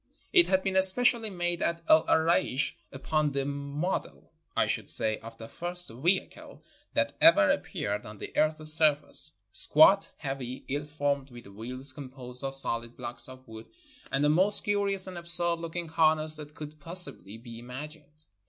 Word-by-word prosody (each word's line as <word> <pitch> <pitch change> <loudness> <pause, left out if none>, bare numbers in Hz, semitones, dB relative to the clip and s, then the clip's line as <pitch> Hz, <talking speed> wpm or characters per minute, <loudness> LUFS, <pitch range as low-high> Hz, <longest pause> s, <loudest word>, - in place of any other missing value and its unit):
It 355 -3 +5
had 190 0 +1
been 190 -1 -2
especially 220 +4 +3
made 175 -2 -2
at 170 0 -1
El 160 +1 +4
Araish 160 -4 +1 0.2
upon 150 +2 -2
the 135 0 -2
model, 140 +5 -5 0.3
I - - +3
should - - -3
say, 110 -1 0
of 115 0 -12
the 115 - -10
first 175 +2 -1
vehicle 170 +11 -3 0.3
that - - 0
ever 305 -3 +6
ap 290 - -2
peared 105 - -4
on 105 0 -11
the - - -10
earth's 155 0 +2
surface; 155 -1 +3 0.2
squat, 155 - +5
heavy, 135 -3 -7
ill 145 +2 -4
formed, 145 -2 -3
with 120 -2 -13
wheels 125 +7 -3
composed 130 -2 -9
of 135 0 -4
solid 115 -3 -2
blocks 120 0 +1
of 130 0 -14
wood, 110 0 -12 0.4
and 135 - 0
the 150 - +3
most 185 +7 +5
curious 200 -2 0
and 185 -2 -7
absurd 170 0 +1
looking 170 +1 -6
harness 155 -1 +3
that 150 0 -11
could 150 0 -10
pos 170 +4 -2
sibly 100 +4 -12
be 115 0 -11
imagined. 150 +4 -11
150 Hz, 170 wpm, -27 LUFS, 130-175 Hz, 0.4 s, ever